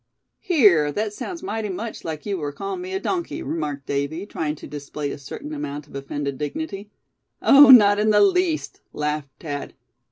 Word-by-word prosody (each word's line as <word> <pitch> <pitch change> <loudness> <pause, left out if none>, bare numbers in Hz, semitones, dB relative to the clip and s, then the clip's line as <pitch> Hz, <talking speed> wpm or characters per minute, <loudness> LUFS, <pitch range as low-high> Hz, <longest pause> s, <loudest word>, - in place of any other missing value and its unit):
"Here, 200 - +4
that 210 0 -2
sounds 345 - -6
mighty 220 - -3
much 215 +4 -5
like 155 -2 -5
you 200 -3 -2
were 145 -2 -3
calling 380 - -5
me 370 +1 -6
a - - 0
donkey," 360 -3 -3
remarked 145 -4 -4
Davy, 140 +6 -2
trying 155 -7 -3
to - - -11
display 145 0 -5
a - - -7
certain 295 - -8
amount 145 - -5
of - - -20
offended 140 0 -4
dignity. 200 - -5 0.5
"Oh! 280 0 +8
not 205 -5 +8
in 215 +1 +2
the 210 - +5
least," 365 -5 +1
laughed 150 -1 -2
Thad. 145 -3 -6
190 Hz, 180 wpm, -23 LUFS, -, 0.5 s, Oh